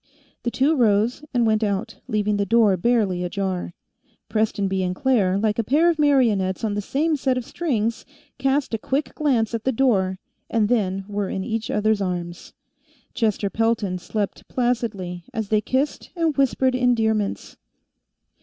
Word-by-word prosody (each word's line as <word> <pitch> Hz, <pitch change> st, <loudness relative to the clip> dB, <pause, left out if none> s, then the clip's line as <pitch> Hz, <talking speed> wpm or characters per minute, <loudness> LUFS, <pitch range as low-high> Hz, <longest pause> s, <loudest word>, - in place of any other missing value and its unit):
The 240 Hz, -, -1 dB
two 275 Hz, +6 st, +2 dB
rose 225 Hz, +1 st, +2 dB
and 240 Hz, -2 st, +2 dB
went 220 Hz, 0 st, +2 dB
out, 200 Hz, 0 st, -2 dB
leaving 210 Hz, -1 st, 0 dB
the 200 Hz, -, +1 dB
door 220 Hz, -3 st, +4 dB
barely 195 Hz, -3 st, +1 dB
ajar. 185 Hz, -1 st, -3 dB, 0.5 s
Prestonby 200 Hz, -3 st, 0 dB
and 180 Hz, 0 st, -1 dB
Claire, 205 Hz, -7 st, +2 dB
like 215 Hz, +1 st, 0 dB
a -, -, +2 dB
pair 305 Hz, +10 st, +3 dB
of 320 Hz, -, -5 dB
marionettes 230 Hz, -10 st, +2 dB
on 215 Hz, -2 st, 0 dB
the 205 Hz, -, -1 dB
same 305 Hz, +9 st, 0 dB
set 265 Hz, -2 st, 0 dB
of 250 Hz, -, -3 dB
strings, 230 Hz, -10 st, -2 dB, 0.4 s
cast 270 Hz, -1 st, 0 dB
a 225 Hz, -, 0 dB
quick 275 Hz, +6 st, -2 dB
glance 245 Hz, -7 st, +1 dB
at 225 Hz, -1 st, -2 dB
the 265 Hz, -, +1 dB
door 205 Hz, -7 st, +1 dB, 0.3 s
and 215 Hz, -2 st, +1 dB
then 195 Hz, -5 st, 0 dB
were 205 Hz, -1 st, -2 dB
in 190 Hz, -, -3 dB
each 225 Hz, 0 st, -3 dB
other's 210 Hz, 0 st, +1 dB
arms. 175 Hz, -2 st, -4 dB, 0.6 s
Chester 210 Hz, -3 st, 0 dB
Pelton 225 Hz, -5 st, 0 dB
slept 205 Hz, +2 st, -4 dB
placidly 220 Hz, -8 st, -2 dB
as 220 Hz, -3 st, -2 dB
they 215 Hz, -1 st, +3 dB
kissed 265 Hz, +6 st, -1 dB
and 330 Hz, -3 st, 0 dB
whispered 265 Hz, -1 st, +2 dB
endearments. 225 Hz, -5 st, 0 dB
220 Hz, 160 wpm, -23 LUFS, 200-250 Hz, 0.6 s, door